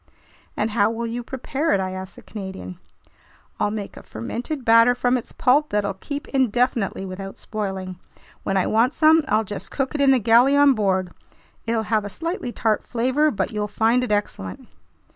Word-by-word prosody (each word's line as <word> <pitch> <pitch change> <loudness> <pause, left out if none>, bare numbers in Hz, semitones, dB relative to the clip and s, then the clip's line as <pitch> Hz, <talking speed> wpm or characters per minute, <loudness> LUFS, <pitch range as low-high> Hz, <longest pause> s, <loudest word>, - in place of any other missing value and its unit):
"And 215 +1 0
how 210 -1 +3
will 230 +1 -3
you 235 +1 -3
prepare 270 +6 -2
it?" - - +2
I 185 0 -2
asked 185 0 -7
the - - -14
Canadian. 190 - -8 0.8
"I'll - - +2
make 205 -1 -5
a - - -10
fermented 240 - -5
batter 230 +2 +6
from 245 +1 +1
its 245 - -4
pulp 285 +4 +2
that'll 205 -1 0
keep 285 +9 -6
indefinitely 245 -6 0
without 195 +1 -7
spoiling. 190 -4 -5 0.4
When 195 - -1
I 190 - +2
want 230 +5 +2
some, 315 0 +5
I'll 215 +2 +2
just 205 -1 -7
cook 270 -2 -2
it 295 - -1
in 275 - +5
the 265 - +6
galley 240 +4 +5
on 285 -1 +6
board—it'll 205 +2 -3
have 215 -1 0
a 205 - -5
slightly 330 - -4
tart 220 -2 0
flavor, 260 +6 +1
but 220 - -2
you'll 210 -1 -2
find 225 +4 +2
it 250 - -3
excellent." 95 - -3
225 Hz, 180 wpm, -23 LUFS, 200-255 Hz, 0.8 s, batter